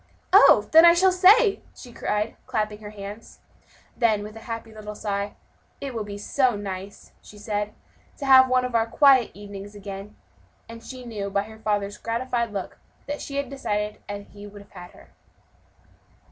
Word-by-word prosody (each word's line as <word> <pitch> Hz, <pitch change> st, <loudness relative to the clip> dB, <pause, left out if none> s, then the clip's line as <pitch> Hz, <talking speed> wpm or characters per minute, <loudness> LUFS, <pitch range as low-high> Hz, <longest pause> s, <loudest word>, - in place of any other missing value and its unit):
"Oh, -, -, +7 dB
then 325 Hz, +1 st, +8 dB
I 340 Hz, 0 st, +8 dB
shall 375 Hz, +2 st, +4 dB
stay!" 390 Hz, +4 st, +5 dB
she 245 Hz, -2 st, -12 dB
cried, 210 Hz, -1 st, -2 dB
clapping 215 Hz, -2 st, -2 dB
her 210 Hz, -1 st, -9 dB
hands. 205 Hz, +1 st, -10 dB, 0.6 s
Then, 220 Hz, -4 st, +1 dB
with 210 Hz, +1 st, -9 dB
a -, -, -9 dB
happy 230 Hz, -1 st, -6 dB
little 210 Hz, -1 st, -8 dB
sigh, 200 Hz, -1 st, -3 dB, 0.4 s
"It 275 Hz, -2 st, -6 dB
will 225 Hz, -2 st, -3 dB
be 205 Hz, -1 st, -7 dB
so 250 Hz, +3 st, +1 dB
nice," 195 Hz, -1 st, -7 dB
she 210 Hz, -, -15 dB
said, 210 Hz, 0 st, -3 dB, 0.4 s
"to 280 Hz, -, -6 dB
have 260 Hz, -1 st, +7 dB
one 255 Hz, 0 st, +2 dB
of 250 Hz, -, -5 dB
our 225 Hz, -1 st, +2 dB
quiet 265 Hz, -1 st, +5 dB
evenings 205 Hz, 0 st, -10 dB
again." 200 Hz, 0 st, -8 dB, 0.5 s
And 230 Hz, 0 st, -11 dB
she 255 Hz, 0 st, -9 dB
knew, 210 Hz, -4 st, -5 dB
by 200 Hz, 0 st, 0 dB
her 220 Hz, +1 st, -13 dB
father's 205 Hz, -2 st, -2 dB
gratified 235 Hz, 0 st, -2 dB
look, 195 Hz, -3 st, -6 dB, 0.3 s
that 290 Hz, 0 st, -5 dB
she 280 Hz, -, -7 dB
had 280 Hz, -1 st, -1 dB
decided 210 Hz, -6 st, -3 dB
as 205 Hz, 0 st, -6 dB
he 205 Hz, 0 st, -11 dB
would 205 Hz, 0 st, -12 dB
have -, -, -28 dB
had 180 Hz, -2 st, -11 dB
her. -, -, -18 dB
215 Hz, 180 wpm, -24 LUFS, 205-250 Hz, 0.6 s, then